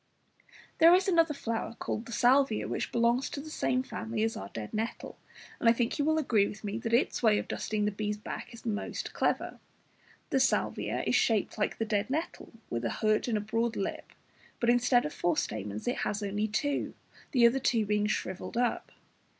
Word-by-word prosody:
There 335 +2 +8
is 375 +1 +2
another 330 -5 +3
flower, 230 -2 -3
called 225 - -4
the - - -8
Salvia, 245 0 +3
which - - -3
belongs 235 +2 +2
to - - -5
the 310 +2 -8
same 255 -3 0
family 225 -3 -3
as 225 0 0
our 100 - -6
dead 110 -2 -7
nettle, 225 +2 -4 0.4
and 230 - +4
I - - +6
think 235 +2 -1
you 285 - +2
will 315 +1 +2
agree 225 -9 +3
with 210 +1 -9
me 210 +2 -3
that 230 -1 -4
its 235 +3 +2
way 220 -3 +4
of - - -3
dusting 210 -1 -2
the 210 - +1
bee's 210 0 -3
back 210 - -7
is 230 -1 -13
most 210 -2 -3
clever. - - -1 0.7
The 270 - +3
Salvia 265 - +1
(Fig. - - -2
60) - - 0
is - - +3
shaped 220 -4 +2
just - - -12
like 205 - 0
the 225 - -1
dead 210 0 0
nettle, 315 +5 -3 0.2
with 115 0 -2
a 115 - 0
hood 215 - +1
and 225 -3 +1
a - - -1
broad 225 +2 -1
lip, 195 - -4 0.5
but 235 0 +3
instead 245 0 +3
of 150 - -4
four 175 -3 0
stamens 105 0 -3
it 245 - 0
has 210 0 -2
only 205 +2 -1
two, 280 +7 -1 0.4
the 245 -4 +5
other 240 +3 +4
two 230 -4 +1
being 210 0 +1
shrivelled 190 +1 -3
up. 245 0 0
225 Hz, 215 wpm, -30 LUFS, 210-250 Hz, 0.7 s, There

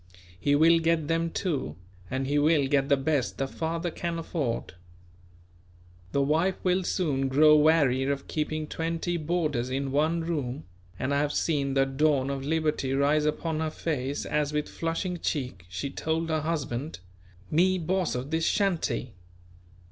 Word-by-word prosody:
He 145 +9 +2
will 165 +3 +5
get 165 -2 +1
them 165 +1 +1
too; 150 - -2 0.3
and 130 +1 -2
he 145 +2 +1
will 150 -1 +3
get 135 0 +1
the 140 - +5
best 135 -1 0
the 135 - 0
father 165 +4 -3
can 170 0 -3
afford. 150 - -3 1.4
The 140 - +2
wife 165 +6 +2
will 185 0 +2
soon 145 -8 0
grow 150 +3 +6
weary 150 -4 +4
of 140 0 -2
keeping 155 0 -2
twenty 165 +2 -2
boarders 155 -6 -1
in 135 +1 -2
one 155 +4 +1
room; 145 - -3 0.3
and 130 +6 -1
I 140 - +2
have 145 0 0
seen 140 -4 0
the 135 0 +4
dawn 135 0 +1
of 135 -1 -4
liberty 150 -3 0
rise 145 +2 +2
upon 155 +1 -1
her 160 0 0
face 145 -3 -3
as 150 -1 0
with 150 0 -1
flushing 170 +2 -3
cheek 125 - -3
she 135 +10 -4
told 160 +2 -2
her 155 -1 +1
husband: 150 -3 -3 0.5
"Me 185 +4 +3
boss 180 0 -1
of 130 +4 -4
this 160 0 +1
shanty." 175 - 0
150 Hz, 160 wpm, -27 LUFS, 135-165 Hz, 1.4 s, grow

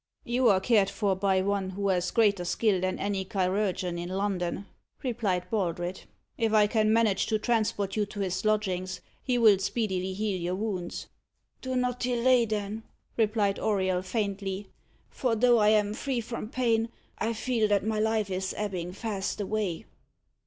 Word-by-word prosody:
"You 245 +1 +2
are 195 -2 +5
cared 200 -1 +3
for 200 -3 0
by 190 0 +2
one 200 -1 0
who 200 +1 -2
has 180 -1 +1
greater 205 -5 +3
skill 190 +1 +1
than 185 0 -1
any 200 -1 -1
chirurgeon 185 -2 -1
in 175 +1 -5
London," 190 -1 -2 0.4
replied 210 -8 -1
Baldred. 180 -3 -2 0.4
"If 225 -2 +1
I 210 -1 +6
can 215 0 +2
manage 220 -4 +2
to 220 - +1
transport 210 -4 0
you 210 -2 0
to 205 0 -6
his 185 -1 -2
lodgings, 185 -4 0 0.2
he 250 -2 0
will 215 -5 +6
speedily 190 -2 -1
heal 200 -3 -1
your 175 +2 -1
wounds." 190 -4 -3 0.6
"Do 260 0 -3
not 250 -1 0
delay, 245 0 +3
then," 210 0 -3 0.3
replied 210 -3 +1
Auriol 190 -4 +1
faintly; 200 -1 -3 0.4
"for 250 -5 0
though 240 +1 +4
I 210 0 +5
am 210 -1 +3
free 260 +2 -2
from 230 -1 -5
pain, 230 -2 +1 0.3
I 225 +1 0
feel 225 -1 0
that 205 -1 +1
my 220 -1 0
life 215 -2 +1
is 190 0 -2
ebbing 180 -4 -3
fast 200 -2 -3
away." 205 -4 -2
205 Hz, 165 wpm, -28 LUFS, 190-225 Hz, 0.6 s, I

